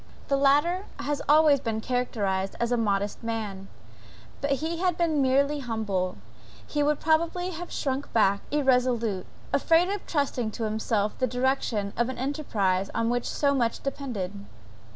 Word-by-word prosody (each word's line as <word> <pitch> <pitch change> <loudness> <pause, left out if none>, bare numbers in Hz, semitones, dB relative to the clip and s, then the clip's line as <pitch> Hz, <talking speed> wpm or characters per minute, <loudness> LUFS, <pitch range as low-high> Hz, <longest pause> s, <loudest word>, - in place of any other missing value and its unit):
The 280 - +3
latter 295 +8 +3
has 290 0 -2
always 300 -1 +6
been 225 -3 -2
characterized 205 -6 -1
as 235 0 0
a - - +4
modest 205 -3 0
man; 210 -4 -4 0.7
but 285 - -1
had 275 - +2
he 335 +3 0
been 325 -4 +1
merely 280 +3 +2
humble, 210 - -2 0.5
he 295 - -1
would 295 0 +2
probably 335 +3 +1
have 350 +1 -7
shrunk 275 -1 -2
back 200 -3 +3
irresolute, 250 -8 +1 0.3
afraid 335 +2 +4
of 405 -1 -3
trusting 275 -7 0
to 230 - -4
himself 215 -1 0
the 255 - +2
direction 245 -5 0
of 235 +2 +1
an 260 - -5
enterprise 215 -9 0
on 230 +1 +1
which 245 0 -1
so 285 -1 +1
much 235 -4 0
depended. 210 -9 -4
255 Hz, 150 wpm, -27 LUFS, 215-290 Hz, 0.7 s, always